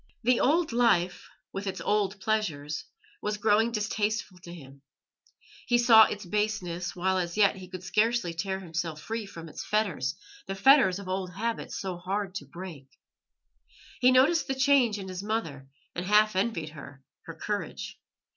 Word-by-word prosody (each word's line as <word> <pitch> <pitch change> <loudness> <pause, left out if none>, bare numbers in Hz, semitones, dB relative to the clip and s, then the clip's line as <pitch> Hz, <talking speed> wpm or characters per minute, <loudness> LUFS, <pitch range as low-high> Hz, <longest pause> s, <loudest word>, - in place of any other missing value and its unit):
The 245 +1 +3
old 315 +3 +2
life, 185 -7 +2 0.2
with 195 +1 -4
its 190 -1 -3
old 205 +2 0
pleasures, 160 -9 -2 0.4
was 210 0 -2
growing 220 +2 +3
distasteful 210 -3 -2
to 170 -1 -11
him; 140 -5 -12 0.9
he 240 - +4
saw 230 -2 +8
its 205 -1 -5
baseness 185 -3 -2
while 190 +1 +1
as 175 +1 -3
yet 200 -2 +4
he 185 -1 -9
could 185 0 -8
scarcely 215 -2 +1
tear 190 +3 -3
himself 165 -3 -4
free 225 +4 -5
from 165 -3 -9
its 155 - -7
fetters 180 -12 0 0.3
the 195 - -3
fetters 195 -3 +5
of 200 -2 -9
old 185 -1 -3
habit 225 +4 -3
so 185 -3 -4
hard 190 +2 -3
to 205 - -6
break. 170 -7 -9 1.1
He 255 0 +5
noticed 280 +6 +4
the 270 - -1
change 260 -5 +3
in 195 -1 -7
his 185 0 -5
mother, 180 -11 -3 0.3
and 175 - -4
half 210 +2 +4
envied 190 -6 -1
her 140 -2 -12 0.2
her - - -7
courage. - - -5
195 Hz, 165 wpm, -28 LUFS, 175-220 Hz, 1.1 s, saw